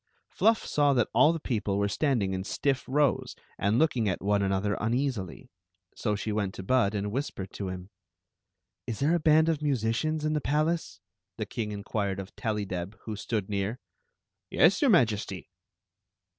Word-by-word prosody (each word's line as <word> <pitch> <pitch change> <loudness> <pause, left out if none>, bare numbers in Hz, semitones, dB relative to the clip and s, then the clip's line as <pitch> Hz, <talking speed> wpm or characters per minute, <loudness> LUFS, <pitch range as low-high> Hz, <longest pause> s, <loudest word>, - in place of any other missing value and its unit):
Fluff 225 0 +2
saw 145 -1 +3
that 125 - +2
all 155 - +6
the 165 - -3
people 105 -8 -1
were 100 0 +1
standing 110 -5 0
in 95 0 -2
stiff 135 +5 -1
rows 145 0 +1 0.2
and 100 +3 +2
looking 125 -8 +2
at 95 - -2
one 100 +1 +1
another 100 +1 0
uneasily, 115 - -2 0.4
so 105 -3 -1
she 105 +1 -3
went 105 -2 -1
• - - -14
to 95 - -7
Bud 110 -1 +2
and 100 0 -2
whispered 105 -6 -4
to 100 - -4
him. 90 +2 -7 0.5
" - - -59
Is 115 - -3
there 150 +4 +2
a 175 - +3
band 155 0 +4
of 160 -2 0
musicians 145 +3 0
in 155 - +1
the 150 - 0
palace?" 155 +4 0 0.4
the 110 - -2
king 105 0 -4
inquired 100 -1 -2
of 95 0 -8
Tellydeb, 100 -4 -3
who 110 - -4
stood 105 -1 -3
near. 100 +4 -2 0.7
"Yes, - - +4
your 285 - +4
Majesty." 105 - +1
110 Hz, 175 wpm, -28 LUFS, 100-145 Hz, 0.7 s, all